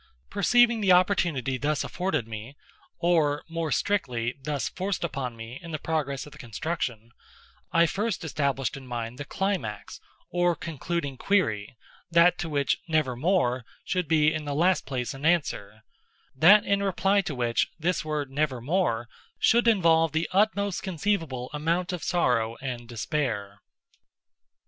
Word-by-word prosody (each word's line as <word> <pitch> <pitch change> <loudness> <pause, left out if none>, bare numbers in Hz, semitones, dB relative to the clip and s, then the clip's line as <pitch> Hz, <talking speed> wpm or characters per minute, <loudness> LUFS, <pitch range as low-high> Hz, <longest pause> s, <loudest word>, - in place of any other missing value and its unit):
Perceiving 240 -2 +4
the 195 -2 +3
opportunity 170 - +2
thus 150 +2 0
afforded 180 - -2
me—or, 145 +7 -2
more 165 -2 -3
strictly, 125 - 0
thus 145 0 -2
forced 190 0 -3
upon 135 -7 -3
me 115 +3 -8
in 170 - -9
the 155 - -3
progress 150 -4 -2
of 150 - -12
the - - -14
construction—I 120 +4 -3
first 205 +3 -2
established 140 -4 -1
in 135 -1 -10
mind 120 0 -5
the 145 - -5
climax, 190 - -3 0.3
or 175 -1 +2
concluding 160 -3 -4
query—that 170 - +1
to 175 - -3
which 140 -3 +1
"Nevermore" 140 -3 +1 0.2
should 180 -3 -1
be 155 -1 +3
in 155 -1 -4
the 145 -1 -3
last 175 +1 +2
place 125 -4 -3
an 135 +1 -10
answer—that 155 - +2
in 200 0 +1
reply 195 +1 +2
to 175 -7 -5
which 120 -2 +1
this 175 +3 0
word 150 -3 -3
"Nevermore" 135 -2 0 0.3
should 235 +1 +3
involve 165 -7 +4
the 160 +1 0
utmost 200 -1 +1
conceivable 165 -9 -2
amount 170 +5 -1
of 175 - -4
sorrow 115 -9 +1
and 125 -3 -5
despair. 115 -6 -2
155 Hz, 135 wpm, -27 LUFS, 125-175 Hz, 0.3 s, Perceiving